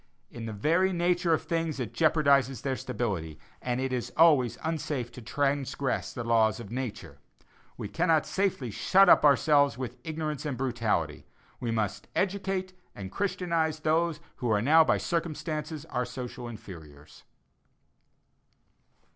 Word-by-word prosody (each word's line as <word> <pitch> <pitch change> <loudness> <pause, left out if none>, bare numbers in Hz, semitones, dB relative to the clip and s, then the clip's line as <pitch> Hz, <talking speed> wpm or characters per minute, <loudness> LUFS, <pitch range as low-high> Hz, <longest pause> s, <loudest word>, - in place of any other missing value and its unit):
In 115 -1 -7
the - - -4
very 165 - +2
nature 175 0 +1
of 160 - +2
things 165 -3 -2
it 120 -3 -4
jeopardizes 140 -4 +3
their 135 -1 -1
stability, 100 -12 -3 0.2
and 125 0 -2
it 130 0 -2
is 125 -2 -3
always 150 -8 +5
unsafe 150 -6 -2
to 125 - -10
transgress 140 +1 -1
the 120 - -5
laws 115 -1 +2
of 110 -3 -9
nature. 125 -3 -5 0.6
We - - -5
cannot 160 - +2
safely 185 - -1
shut 195 - +4
ourselves 145 -1 +5
up - - -17
with 130 -2 -5
ignorance 155 -3 -4
and 145 -5 -3
brutality; 115 - -1 0.3
we 120 - -3
must 105 -3 -2
educate 190 -1 -1 0.2
and 95 -1 -7
christianize 170 - -1
those 160 0 +1 0.2
who 120 - -2
are 105 -2 +3
now 155 +8 +6
by - - +2
circumstances 155 -2 -3
our 125 - 0
social 125 -1 -7
inferiors. 80 -9 -12
140 Hz, 140 wpm, -28 LUFS, 115-160 Hz, 0.6 s, now